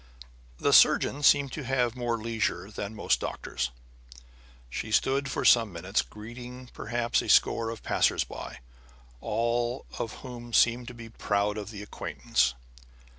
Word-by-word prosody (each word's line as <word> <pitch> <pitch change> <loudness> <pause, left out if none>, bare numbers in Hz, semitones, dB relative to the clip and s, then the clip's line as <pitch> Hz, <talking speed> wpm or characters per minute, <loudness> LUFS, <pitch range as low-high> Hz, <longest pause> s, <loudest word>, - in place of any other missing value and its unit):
The - - +1
surgeon 145 - +5
seemed 140 -2 +5
to 150 - -5
have 125 -2 0
more 120 -2 -1
leisure 110 -4 -2
than 105 +1 -6
most - - +1
doctors. 60 -1 -3 1.0
She 105 - -5
stood 135 +5 +2
for - - -2
some 115 -4 +5
minutes, 90 +4 -1
greeting 125 +3 -10
perhaps 120 +1 -1
a - - -6
score 115 -1 +4
of 115 -1 -7
passers - - +2
by, - - -9 0.6
all 120 - -1
of 115 - -3
whom 120 -2 -9
seemed 120 +1 +3
to 125 - -8
be 115 -1 -10
proud 105 -1 0
of 105 -2 -6
the 105 -2 -8
acquaintance. 65 -9 -1
115 Hz, 145 wpm, -28 LUFS, 105-125 Hz, 1.0 s, surgeon